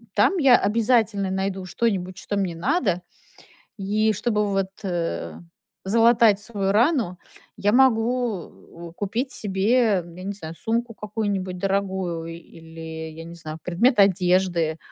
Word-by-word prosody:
там 215 - +3
я 270 -6 +6
обязательно 220 -2 +1
найду 190 0 -2
что-нибудь, 185 -3 -2
что 205 - -4
мне 185 -4 -1
надо. 195 - 0 0.8
И 215 +2 +1
чтобы 210 0 0
вот, 195 -1 0
э, 175 -3 -3 0.5
залатать 225 0 +4
свою 200 -3 -2
рану, 225 - +2 0.4
я 205 +2 +1
могу 240 -5 +2 0.4
у 165 - -12
купить 225 +8 -3
себе, 205 0 +1
я 175 +2 -11
не 200 - -3
знаю, 165 -4 -8
сумку 230 +1 -2
какую-нибудь 205 -4 -3
дорогую 190 -4 -2
или, 160 -1 -9
я 165 +1 -9
не 170 +1 -10
знаю, 160 -2 -8
предмет 210 +7 +2
одежды, 180 -4 +3
195 Hz, 130 wpm, -23 LUFS, 180-225 Hz, 0.8 s, я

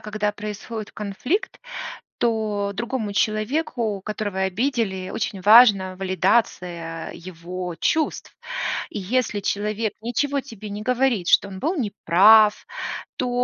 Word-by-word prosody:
когда 210 0 -2
происходит 210 +1 -7
конфликт, 215 - -3 0.6
то 215 -3 0
другому 230 0 -3
человеку, 215 0 -1
которого 210 -2 -3
обидели, 190 -1 -1
очень 205 -3 -3
важно 200 -3 +6
валидация 180 -4 0
его 180 0 -7
чувств. 315 - -1 0.6
И, 210 - -5
если 220 +1 0
человек 210 +2 -1
ничего 275 +5 -1
тебе 225 -6 -10
не 205 +1 -5
говорит, 250 -5 +1
что 200 - +5
он 190 -1 -8
был 325 +7 0
неправ, 210 - +5 0.5
то 250 - -2
210 Hz, 110 wpm, -23 LUFS, 190-235 Hz, 0.6 s, важно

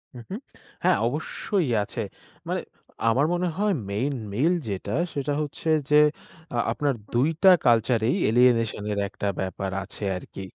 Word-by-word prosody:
হু, - - -8
হু, 190 - -4 0.5
হ্যাঁ - - +4
অবশ্যই 185 - -2
আছে। 115 +3 -5 0.5
মানে - - -1 0.5
আমার 130 +6 +3
মনে 180 +1 0
হয় 205 0 +2 0.2
মেইন 125 +8 -1 0.2
মেইল 150 - +3
যেটা, 100 0 -4 0.2
সেটা 145 0 -1
হচ্ছে 150 +2 -6 0.2
যে 150 - +4 0.6
আ - - 0
আপনার 140 +4 0 0.2
২ 125 +4 +3 0.2
টা 190 - +9 0.2
কালচারেই 115 0 +3
alienation 115 -2 +3
এর 100 - -2
একটা 100 - -4
ব্যাপার 95 +1 -3
আছে 100 +2 -9
আরকি। 95 - -9
125 Hz, 150 wpm, -25 LUFS, 105-145 Hz, 0.6 s, টা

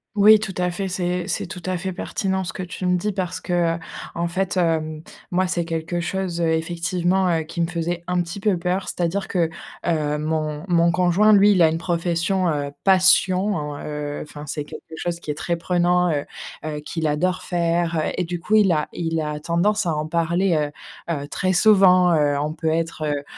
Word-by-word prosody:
Oui, 210 +1 +7
tout 205 -2 -4
à 180 0 0
fait. 190 +2 -3
C'est 180 -1 -2
c'est 170 - -1
tout 180 +1 -8
à 185 - 0
fait 190 +1 -4
pertinent 190 +1 -2
ce 175 - -4
que 185 - -6
tu 180 0 -5
me 180 - +3
dis 210 +4 -1
parce 185 -2 -3
que, 175 -2 0
heu, - - -7 0.4
en 170 0 -1
fait, 185 +2 -2
hem, 160 -3 0 0.3
moi 185 +1 +1
c'est 175 -1 -1
quelque 165 +1 -3
chose 175 0 -2
effectivement, 170 +3 0
heu, 165 -2 +1
qui 170 +2 -5
me 165 - +1
faisait 170 0 -3
un 180 -1 +1
petit 170 +4 -7
peu 200 -2 +1
peur. 180 +3 -2
C'est-à-dire 180 +3 -2
que, 175 -3 +1 0.4
heu, 150 -3 0
mon 155 0 -2
mon 170 -1 +3
conjoint 180 +4 +4
lui, 205 0 +6
il 185 -4 +3
a 160 - +7
une 160 - -1
profession, 175 +2 0
heu, 145 -2 -2
passion 190 +1 +4
en, 150 -2 -4
heu, 150 -1 -5
enfin, 150 0 -10
c'est 150 +1 -3
quelque 145 - -10
chose 170 +1 -3
qui 165 - -11
est 150 - -1
très 170 +3 -2
prenant, 175 +1 +2
heu 145 -1 -1 0.4
heu, 150 -1 -3
qu'il 160 +2 -4
adore 180 +5 0
faire, 170 -1 0
heu, - - -1
et 180 - +1
du 175 +1 -4
coup 215 +6 0
il 205 -4 +5
a 150 -2 +1
il 165 -1 -2
a 150 -1 -3
tendance 180 +7 +1
à 165 -3 0
en 150 +1 -2
parler, 170 +2 +1
heu 150 -1 0 0.4
heu, 145 0 -5
très 185 +5 -1
souvent, 185 -2 +6
heu, 145 -2 +2
on 150 +1 -2
peut 160 0 -2
être, 165 0 -2
heu 145 -1 -1
170 Hz, 215 wpm, -22 LUFS, 160-185 Hz, 0.4 s, Oui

